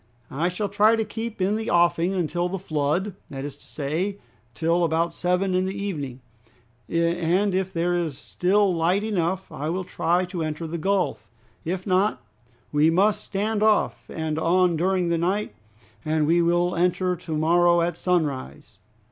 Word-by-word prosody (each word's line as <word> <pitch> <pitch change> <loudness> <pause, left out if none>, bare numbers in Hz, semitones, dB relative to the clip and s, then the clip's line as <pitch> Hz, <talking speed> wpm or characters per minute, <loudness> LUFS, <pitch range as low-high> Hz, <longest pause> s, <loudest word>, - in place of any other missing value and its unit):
"I 160 +6 0
shall 190 +3 -2
try 210 +3 +4
to 220 -1 -1
keep 225 +1 -6
in 205 +3 +1
the 220 - -3
offing 175 +1 +2
until 175 0 -1
the 195 - -3
flood, 170 +3 -1 0.2
that 135 0 -6
is 145 -2 -6
to - - -14
say, 165 +8 -2 0.4
till 170 +2 +1
about 165 +1 +1
seven 180 +2 0
in 185 0 +2
the 190 +1 -4
evening, 145 -11 -4 0.7
and 170 +4 +1
if 190 0 -1
there 175 0 0
is 165 -6 -1
still 190 +5 +1
light 175 +4 +1
enough 190 -3 -1
I 150 +3 -4
will 185 +3 -2
try 175 0 0
to 180 -1 -5
enter 155 +1 -3
the 165 +1 -4
gulf; 180 - -1 0.3
if 180 +3 -3
not, 195 +2 +2 0.5
we 150 +2 +4
must 195 +5 +2
stand 210 +2 -2
off 215 -1 +2
and 160 -1 -3
on 180 +1 +3
during 180 +1 +1
the 170 -1 +1
night, 190 +5 -1 0.5
and 155 0 +1
we 170 +3 +3
will 175 +1 +2
enter 180 +1 +1
to 160 -2 -4
morrow 170 +2 +4
at 170 0 0
sunrise." 160 -8 -2
175 Hz, 170 wpm, -24 LUFS, 165-190 Hz, 0.7 s, try